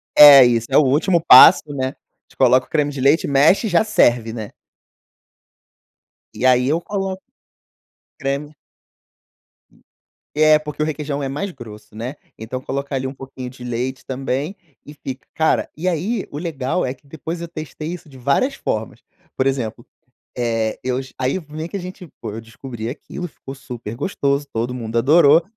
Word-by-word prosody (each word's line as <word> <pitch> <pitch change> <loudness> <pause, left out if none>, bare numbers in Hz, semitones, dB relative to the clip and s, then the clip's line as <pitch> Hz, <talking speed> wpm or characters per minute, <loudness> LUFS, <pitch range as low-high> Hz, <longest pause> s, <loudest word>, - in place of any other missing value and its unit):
É 140 -3 +10
isso, 115 -1 +1
é - - +3
o - - +7
último 150 +6 +2
passo, 145 +5 +9
né, 130 -1 -1
a - - -2
gente - - -21
coloca 130 0 +4
o - - -37
creme 150 -2 0
de 135 -2 -6
leite, 140 +5 +3
mexe 145 - +4
e - - -1
já 175 +4 +3
serve, 120 - +2
né. 110 -3 -7 1.8
E 130 - -2
aí, 125 0 +4
eu 160 +4 +1
coloco 195 -1 -4 1.0
creme. 140 +2 -3 1.8
É, 155 0 +6
porque 150 0 -7
o - - +2
requeijão 145 -2 -3
é 135 - -3
mais 190 +8 -4
grosso, 105 -5 -12
né? 125 +6 -5 0.2
Então 115 +3 -5
coloca 140 +2 -4
ali 130 0 -2
um 130 - -4
pouquinho 130 -2 -9
de 125 -1 -13
leite 125 +2 -4
também 135 +6 -3 0.3
e 145 - -12
fica 130 -2 -8
cara, 160 0 +1
e 180 +4 -3
aí, 185 +7 -1
o 145 - -5
legal 160 -1 -2
é 130 - -2
que 140 - -26
depois 160 +4 -6
eu 170 - -6
testei 155 -1 -7
isso 170 -3 -8
de 135 - -14
várias 140 - +1
formas, 110 - -4 0.4
por 130 - +1
exemplo, 120 -4 -2 0.5
eh, 115 -2 -1
eus 130 +1 -3
aí, 130 +7 0
vem 155 0 -7
que 200 - -4
a - - -5
gente 180 -1 -9
pô, 110 -3 -5
eu 110 - -7
descobri 115 0 -8
aquilo, 175 +6 -7
ficou 135 -3 -11
super 120 -4 -8
gostoso. 140 -1 -1
Todo 115 +2 -2
mundo 115 -2 -4
adorou, 150 +5 +5
135 Hz, 175 wpm, -20 LUFS, 125-155 Hz, 1.8 s, É